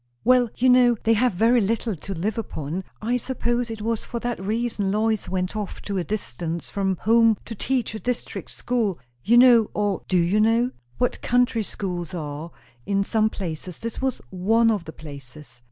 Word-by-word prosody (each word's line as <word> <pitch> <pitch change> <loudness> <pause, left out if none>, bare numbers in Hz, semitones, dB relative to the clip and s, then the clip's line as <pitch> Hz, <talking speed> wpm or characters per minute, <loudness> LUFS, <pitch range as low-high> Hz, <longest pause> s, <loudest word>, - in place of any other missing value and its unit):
"Well, 250 -1 +4
you 255 - +3
know 250 -2 +6
they 225 - +4
have 245 +1 +2
very 230 +6 +4
little 220 +1 -1
to 195 +5 -6
live 210 +7 -2
upon. 170 -3 -4 0.2
I 240 +3 +1
suppose 240 -1 -1
it 220 -2 -6
was 225 0 -1
for 235 - -5
that 240 -1 -2
reason 215 -1 -1
Lois 220 0 0
went 185 +1 -2
off 210 -2 -4
to 200 -2 -2
a - - -1
distance 170 - -4
from 190 -1 0
home 225 +1 +4
to 230 - -6
teach 245 +2 -1
a 220 - -5
district 245 +1 -4
school. 225 -7 -1 0.3
You 235 +5 +4
know, 240 -3 +7
or 205 -2 0
do 185 - +2
you 175 +5 +2
know? 230 +3 +3 0.3
what 245 - 0
country 245 -2 +2
schools 180 -5 -4
are, 150 0 -5 0.3
in 200 +4 +1
some 220 0 +2
places; 175 -3 -6
this 230 +2 -6
was 265 -2 -1
one 225 +5 +3
of 200 -6 -2
the 160 - -8
places. 140 -3 -11
215 Hz, 185 wpm, -24 LUFS, 185-235 Hz, 0.3 s, know